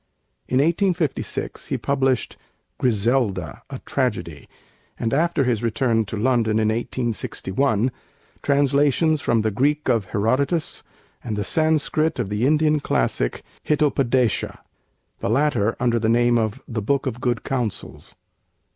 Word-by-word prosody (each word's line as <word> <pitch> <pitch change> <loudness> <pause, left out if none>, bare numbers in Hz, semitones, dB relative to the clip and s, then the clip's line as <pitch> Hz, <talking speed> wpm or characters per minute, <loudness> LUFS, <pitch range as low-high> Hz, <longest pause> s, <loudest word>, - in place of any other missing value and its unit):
In 130 - 0
1856 165 +1 0
he - - -1
published 135 -3 0 0.4
'Griselda, 105 - 0
a - - -5
Tragedy'; 90 - -2 0.5
and 115 +1 -2
after 160 0 +2
his 120 -4 0
return 115 0 +1
to 105 +2 -5
London 115 -1 +2
in 110 -1 +2
1861, 120 0 -1 0.5
translations 145 +2 +2
from 115 -2 +1
the 110 - +1
Greek 145 +6 +1
of 115 -5 +2
Herodotus 130 - 0 0.4
and 110 -3 -3
the 105 - -1
Sanskrit 155 +3 +1
of 120 -6 -2
the 105 +5 +1
Indian 155 0 +3
classic - - -1 0.2
'Hitopadeça,' 135 -5 +1 0.6
the - - -2
latter 115 -4 +2
under 120 -2 +2
the 110 0 0
name 120 +1 +3
of 110 -2 -2
'The 110 -2 -3
Book 140 +7 0
of 125 -2 -4
Good 120 -3 0
Counsels.' 125 -6 -4
125 Hz, 130 wpm, -22 LUFS, 110-140 Hz, 0.6 s, Indian